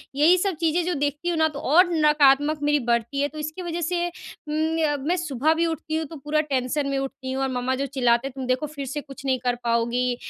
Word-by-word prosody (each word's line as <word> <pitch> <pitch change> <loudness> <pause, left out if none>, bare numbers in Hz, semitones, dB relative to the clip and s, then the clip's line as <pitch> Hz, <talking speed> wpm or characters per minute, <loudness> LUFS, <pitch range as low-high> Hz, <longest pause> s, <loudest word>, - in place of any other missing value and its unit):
यही 320 +6 +5
सब 380 -1 0
चीज़ें 335 +1 +1
जो 360 - 0
देखती 290 +4 -2
हूँ 335 - -1
ना, 315 0 +4
तो 290 -2 -7
और 350 +6 +4
नकारात्मक 300 -1 +4
मेरी 295 0 +3
बढ़ती 235 +4 0
है। 285 - +2
तो 310 - -12
इसकी 310 +4 -5
वज़ह 345 0 -4
से 345 +1 0
उम, 315 -2 -4
य 300 -2 +2
मैं 350 - +2
सुबह 310 -2 +1
भी 335 +1 +1
उठती 320 -1 -3
हूँ 320 - -2
तो 320 - -10
पूरा 300 +1 0
टेंशन 275 0 -1
में 275 - -1
उठती 265 -1 -5
हूँ 265 +1 -2
और 265 - 0
मम्मा 250 +1 -1
जो 275 +2 -2
चिल्लाते 245 -2 +1
हैं, 270 - -9
"तुम 265 - -4
देखो 255 +4 0
फिर 280 -1 -4
से 285 +3 -4
कुछ 275 -1 -12
नहीं 260 -1 +1
कर 245 -1 +2
पाओगी, 240 +1 +1
290 Hz, 250 wpm, -24 LUFS, 265-320 Hz, -, यही